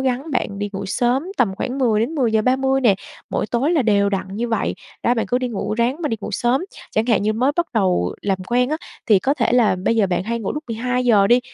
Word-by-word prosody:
gắng 265 +4 -1
bạn 205 -6 -2
đi 205 0 -2
ngủ 195 0 -4
sớm, 245 - +1
tầm 195 -6 +2
khoảng 255 +7 -4
10:00 225 -5 +2
đến 240 +9 -1
10:30 260 +1 +2
nè, 225 -6 +4 0.4
mỗi - - -1
tối 245 +7 0
là 325 -5 +3
đều 200 -3 +3
đặn 190 -2 -2
như 235 +1 -2
vậy, 225 -2 -1 0.3
đó, 240 - +3
bạn 225 - -1
cứ 250 - +1
đi 255 -1 -2
ngủ, 215 -1 -3
ráng 235 +4 +1
mà 300 - 0
đi 225 - -1
ngủ 210 - -5
sớm. 240 - +1 0.3
Chẳng 220 +2 0
hạn 220 -4 +2
như 215 - +1
mới 255 +6 +1
bắt 345 0 +1
đầu 185 - +1
làm 195 -2 0
quen 250 +1 +2
á, 310 - 0 0.3
thì 210 -4 +5
có 270 +9 0
thể 245 -3 0
là 230 -6 +4
bây 230 - +2
giờ 205 -3 +3
bạn 175 -1 -1
hay 235 +3 -2
ngủ 200 - -3
lúc 300 +1 -5
12:00 240 -2 +2
đi, 240 +4 +5
235 Hz, 255 wpm, -20 LUFS, 205-255 Hz, 0.4 s, thì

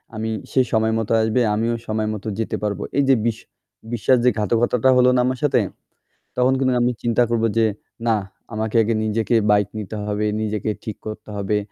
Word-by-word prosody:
আমি 110 +1 -3 0.2
সে 130 - +4
সময় 110 0 +2
মতো 115 - -3
আসবে 110 +3 +1
আমিও 115 +2 0
সময় 110 0 -1
মতো 110 +1 -7
যেতে 110 - -1
পারবো 100 -2 -2
এই 140 - +4
যে 135 - +7
বিশ 115 -1 0 0.6
বিশ্বাস 125 +3 +3
যে - - +7
ঘাতকতাটা 120 +4 +2
হল 125 - +5
না - - +3
আমার 130 0 -1
সাথে 145 - +3 0.8
তখন 125 +1 +3
কিন্তু 130 -1 +2
আমি 125 +1 +2
চিন্তা 120 +1 +3
করবো 115 -1 +2
যে 115 - +4 0.4
না 115 - +4 0.4
আমাকে 110 +1 -3
আগে 115 +2 0
নিজেকে 110 +2 0 0.2
বাইক 105 -1 +3
নিতে 105 0 -5
হবে, 105 0 -1 0.2
নিজেকে 110 0 -2
ঠিক 110 - -5
করতে 110 0 -7
হবে; 100 +1 0
110 Hz, 190 wpm, -21 LUFS, 105-120 Hz, 0.8 s, যে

